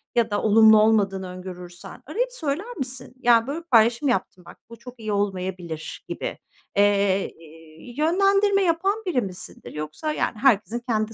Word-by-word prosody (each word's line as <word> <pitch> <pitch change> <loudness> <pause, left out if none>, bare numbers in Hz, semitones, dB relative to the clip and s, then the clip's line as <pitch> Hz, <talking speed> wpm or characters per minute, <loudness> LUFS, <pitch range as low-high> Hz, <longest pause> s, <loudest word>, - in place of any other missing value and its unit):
ya 230 -2 +2
da 205 - -1
olumlu 220 0 +6
olmadığını 200 -4 +2
öngörürsen 180 0 -10
arayıp 485 - -2
söyler 365 - -4
misin? 255 -2 -6
Ya, 235 -2 +4
böyle 295 +4 -3
bir 335 - -17
paylaşım 235 +4 +4
yaptın 185 -6 -2
bak, - - -13
bu 230 - -11
çok 250 0 -12
iyi 215 -1 -4
olmayabilir 185 -5 -4
gibi. - - -5 0.4
Eee, 200 -1 +3
eee, 160 +6 -14
yönlendirme 395 +5 +3
yapan 385 +5 0
biri 325 -10 +1
misindir? 185 -3 -9
Yoksa 155 - -4
yani 225 - -2
herkesin 235 -1 +2
kendi 220 -1 0
225 Hz, 155 wpm, -24 LUFS, 190-285 Hz, 0.4 s, olumlu